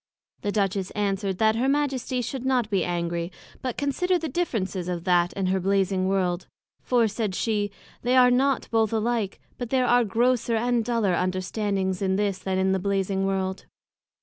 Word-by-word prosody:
The 205 - -1
Duchess 195 -2 0
answered, 195 -2 -1
That 220 +1 +3
her 260 +3 +1
Majesty 265 -3 0
should 255 +2 -4
not 250 -4 +1
be 195 - +2
angry, 170 0 -2 0.3
but 255 -2 -3
consider 360 +6 +1
the 325 -1 -3
differences 205 - -2
of 175 -2 -3
that 175 -1 +3
and 190 -2 0
her 190 0 +1
Blazing 190 0 +1
World; 185 -2 0 0.3
for, 240 -3 +2
said 215 -2 -2
she, 210 -2 0 0.3
they 250 +2 +2
are 250 -1 +7
not 265 +1 +2
both 225 -2 +2
alike; 225 -2 -1 0.2
but 245 -2 -4
there 255 0 +2
are 245 0 +4
grosser 235 +2 +1
and 240 +1 +1
duller 230 -5 +1
understandings 190 +1 -1
in 190 -1 +1
this, 200 -1 0
than 185 0 -2
in 190 0 +2
the 190 - +1
Blazing 195 0 0
World. 190 -1 -2
205 Hz, 175 wpm, -25 LUFS, 190-245 Hz, 0.3 s, are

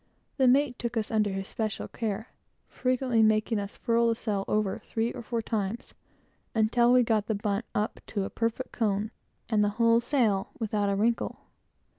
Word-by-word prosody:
The 265 -2 +4
mate 260 0 +3
took 235 -1 -3
us 220 -1 -1
under 215 -2 +2
his 195 0 -4
special 215 -2 -3
care, 220 0 -4 0.4
frequently 255 -2 +1
making 215 0 +3
us 200 0 -6
furl 235 0 +2
the 230 - +2
sail 205 -4 -2
over, 210 -2 0
three 230 +1 -1
or - - -6
four 230 0 -3
times, 215 +1 -3 0.6
until 235 +2 +4
we 250 0 +6
got 220 -3 +1
the 220 - 0
bunt 205 +2 -1
up 210 +1 -1
to 200 -3 -2
a - - -5
perfect 230 +3 -2
cone, 210 -1 0 0.4
and 215 -2 +2
the 205 - +3
whole 230 0 +5
sail 235 -6 +1
without 210 -2 0
a 200 - +1
wrinkle. 230 +4 0
225 Hz, 180 wpm, -28 LUFS, 210-235 Hz, 0.6 s, we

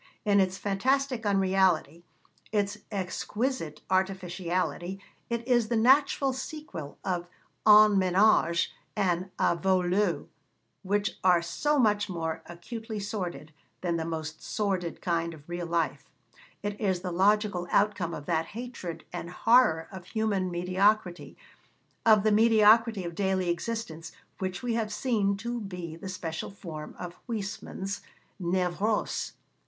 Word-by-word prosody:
In 200 -1 +4
its 190 0 +1
fantastic 250 +4 0
unreality, 190 -5 +2 0.5
its 205 -1 0
exquisite 190 - -3
artificiality, 185 -1 -1 0.3
it 235 0 -3
is 240 -3 +3
the 235 - 0
natural 270 +3 +4
sequel 265 - -7
of 175 -2 -1 0.4
En 210 -1 +8
Ménage 185 -2 +3 0.3
and 185 -2 0
A - - +3
Vau 190 +2 +2
l'Eau, 180 0 0 0.5
which 205 +2 -1
are 180 -2 +5
so 295 - 0
much 210 -5 +2
more 165 -3 -3
acutely 220 +5 -6
sordid 175 -7 -5 0.3
than 170 -2 0
the 165 - -2
most 160 -1 -5
sordid 190 -5 -2
kind 170 -2 0
of 145 -1 -17
real 175 0 -4
life; 170 -1 -1 0.5
it 205 +1 -4
is 190 -4 +1
the 180 -1 -3
logical 195 0 +2
outcome 200 -5 +1
of 145 - -8
that 165 0 0
hatred 235 -9 -6
and 170 - -5
horror 180 -5 +4
of 190 -2 -9
human 200 -2 0
mediocrity, 180 +1 +1 0.7
of 215 -2 +7
the 215 - +3
mediocrity 220 -1 +5
of 170 -1 -5
daily 190 0 0
existence, 170 -4 -4 0.3
which 185 +1 -3
we 245 -1 0
have 225 -2 -1
seen 210 -4 +1
to 235 +3 -3
be 180 -5 -6
the 185 +3 -8
special 165 -3 -4
form 165 -6 -8
of 180 -1 -6
Huysmans' 205 -3 -4 0.4
névrose. 180 +4 0
190 Hz, 130 wpm, -28 LUFS, 175-215 Hz, 0.7 s, En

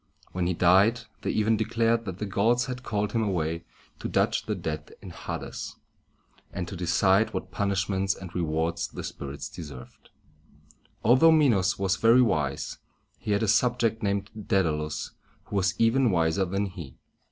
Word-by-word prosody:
When 90 -1 -1
he 90 - 0
died, 95 +7 +4 0.2
they - - -2
even 110 +1 +2
declared 115 +1 +1
that 95 -3 -5
the 105 - -3
gods 110 +5 +2
had 125 -1 -5
called 105 -3 -2
him 115 - 0
away 85 -5 -1 0.3
to - - -4
judge - - +1
the - - -1
dead 75 -1 -5
in - - -10
Ha´des, - - -6 0.8
and 90 -3 -4
to 95 - -7
decide 95 +4 +2
what 95 0 -4
punishments 95 0 0
and 90 -2 -10
rewards 85 0 -1
the - - -8
spirits 70 0 -6
deserved. 70 -6 -11 0.9
Although 130 +8 +6
Minos 110 - +3
was 95 -1 0
very 115 +3 +6
wise, 75 - -1 0.4
he 105 - -1
had 100 +2 +1
a - - +1
subject 115 +1 +2
named 100 0 -1
Dæd´a 95 -6 +1
lus 75 0 -4 0.3
who - - -8
was 95 -1 0
even 120 +2 +4
wiser 85 +1 +2
than 95 +3 -1
he. 85 -8 -9
95 Hz, 165 wpm, -27 LUFS, 85-110 Hz, 0.9 s, Although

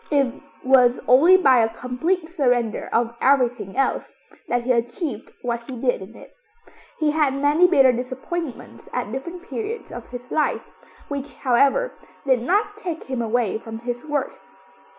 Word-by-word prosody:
It 275 -4 +2 0.3
was 255 -1 +5
only 320 +9 +7
by 270 -9 +5
a 225 -1 +3
complete 320 +10 -2
surrender 245 - 0
of 230 0 +1
everything 250 -7 +2
else 270 - 0 0.4
that 245 0 0
he 255 - +1
achieved 240 - -2
what 235 0 -3
he 255 - -5
did 245 -3 0
in 200 +5 -11
it. - - -14 0.6
He 305 -2 +1
had 295 -3 +1
many 295 +5 +4
bitter 275 -7 +5
disappointments 255 +5 -6
at 245 -4 -3
different 340 +8 -6
periods 445 +3 -5
of 240 -1 -8
his 245 0 -9
life, 305 - -1 0.4
which, 285 0 -5
however, 280 - +2 0.3
did 260 -3 +3
not 415 - 0
take 350 -6 -5
him 260 -2 -3
away 225 -2 0
from 225 0 -8
his 240 +1 -5
work. 295 -3 -3
260 Hz, 155 wpm, -22 LUFS, 240-310 Hz, 0.6 s, only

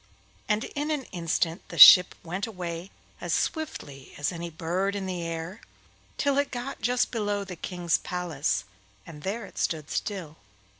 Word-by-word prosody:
And 210 +2 +2
in 295 +1 -2
an 300 -3 -1
instant 165 0 -1
the - - -9
ship 180 -1 +10
went 180 +5 -3
away 180 -3 -6 0.3
as - - -2
swiftly 145 - -3
as 145 - -1
any 170 -1 -5
bird 175 +5 -2
in 200 -1 -3
the 180 -2 -3
air 165 +4 -5 0.6
till 280 -1 +2
it 285 - 0
got 250 +2 -5
just 245 +1 +1
below 205 -3 -1
the 190 -2 -8
King's 175 0 -1
palace, 145 - -2 0.4
and 150 -3 -11
there 205 +6 -3
it - - -10
stood 155 -2 -2
still. 175 -7 -4
180 Hz, 160 wpm, -27 LUFS, 165-210 Hz, 0.6 s, ship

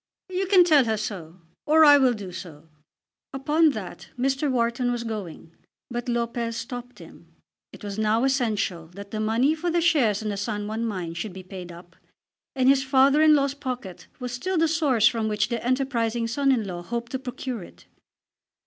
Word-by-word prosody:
"You 375 +1 -2
can 375 -2 +6
tell 305 -7 +5
her 220 -1 0
so; 185 -5 -6 0.3
or 315 +1 +6
I 290 -1 +8
will 260 -2 +4
do 200 -4 -8
so." 160 -3 -10 0.6
Upon 300 +4 +3
that 195 -6 -8
Mr. 270 +3 0
Wharton 245 0 0
was 240 -1 -3
going, 200 -8 -7 0.4
but 240 +1 -4
Lopez 235 -1 -2
stopped 245 0 -7
him. - - -15 0.4
It - - -14
was 205 0 -5
now 220 +2 +2
essential 215 -11 0
that 200 0 -10
the 215 - -3
money 230 +7 +2
for 330 +2 -3
the 345 +1 +1
shares 265 - +2
in 215 - -2
the 200 - -3
San 205 +1 -3
Juan 220 +2 -3
mine 180 -6 -4
should 185 +3 -5
be 190 0 -9
paid 185 -1 -9
up, 175 +1 -14 0.6
and 260 -1 +2
his 270 0 +5
father 270 +2 +4
in 310 -1 +6
law's 275 -1 +1
pocket 255 - -6
was 250 -1 -5
still 360 +10 -2
the 325 0 +3
source 290 -9 +3
from 225 -2 0
which 210 0 0
the 235 -2 -3
enterprising 240 -3 0
son 275 +4 +1
in 235 -5 +1
law 175 -3 -5
hoped 235 +6 -5
to 260 - -3
procure 255 -2 -5
it. 175 - -14
235 Hz, 195 wpm, -25 LUFS, 210-270 Hz, 0.6 s, I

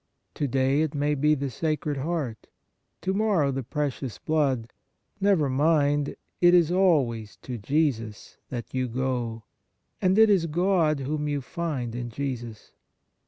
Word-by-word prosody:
To 145 - -1
day 135 +2 +2
it 155 -1 -1
may 145 +1 +1
be 150 +2 +3
the 140 -1 -3
Sacred 150 +1 -2
Heart, 135 -6 -3 0.5
to 190 +3 -1
morrow 195 -9 +2
the 135 0 -2
Precious 135 -2 -3
Blood; 135 -7 0 0.5
never 195 -7 +3
mind, 145 +1 +2 0.3
it 175 0 +7
is 170 -2 +4
always 140 - +2
to 125 -3 -5
Jesus 115 -4 -1
that 120 -3 -6
you 130 -1 0
go, 120 -2 -2 0.6
and 185 +1 +3
it 220 -1 +7
is 180 -4 +3
God 165 -3 +2
whom 150 +2 -2
you 145 -1 -1
find 140 -5 -4
in 120 0 -4
Jesus. 120 -3 -5
145 Hz, 145 wpm, -26 LUFS, 125-160 Hz, 0.6 s, it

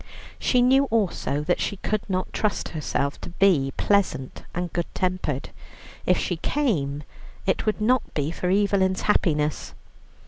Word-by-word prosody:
She 250 -1 +3
knew 265 +2 +5
also 200 - 0
that 175 +3 +1
she 200 - -1
could 215 +2 -1
not 185 -1 -2
trust 215 -2 -1
herself 140 -3 -2
to - - -6
be 170 -7 +3
pleasant 200 -10 +1
and 175 -1 -4
good 170 -1 -1
tempered. 180 -7 -1 0.6
If 180 - +4
she 175 - -1
came, 155 - 0 0.4
it 190 - 0
would 215 - +1
not 245 +4 +1
be 145 +1 0
for 180 +1 -2
Evelyn's 190 -1 +2
happiness. 150 -7 +1
185 Hz, 145 wpm, -25 LUFS, 150-210 Hz, 0.6 s, knew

